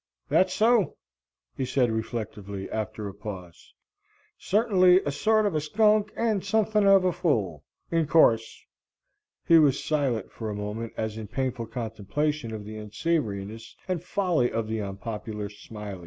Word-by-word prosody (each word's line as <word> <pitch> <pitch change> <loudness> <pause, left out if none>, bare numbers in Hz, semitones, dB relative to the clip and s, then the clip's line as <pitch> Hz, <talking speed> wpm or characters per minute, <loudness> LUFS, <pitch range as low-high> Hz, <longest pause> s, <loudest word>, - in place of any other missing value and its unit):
"That's 185 0 +3
so," 225 -1 +3 0.6
he 135 - -2
said 130 -2 +1
reflectively, 105 -3 -4
after 110 -1 -3
a 100 - -7
pause, 95 -4 -9 0.6
"certingly 190 -4 +4
a 145 - -1
sort 215 +9 +2
of 200 - +1
a 155 - 0
skunk 210 +6 +3
and 220 -4 +1
suthin 210 0 +2
of 195 -1 +6
a 180 - +3
fool. 100 - -1 0.3
In 165 -2 +1
course." 115 -9 +3 0.8
He 165 -1 +7
was 140 -3 +3
silent 135 -9 -1
for 110 -2 -5
a 105 - -4
moment 105 +3 -5
as 110 0 -3
in 110 - -6
painful 125 0 -3
contemplation 115 +4 -3
of 105 -2 -6
the 110 +1 -7
unsavoriness 110 -3 -3
and 180 -4 -2
folly 175 -11 +1
of 115 -1 -2
the 110 0 -2
unpopular 105 +1 -5
Smiley. 105 -1 -9
120 Hz, 150 wpm, -27 LUFS, 105-180 Hz, 0.8 s, He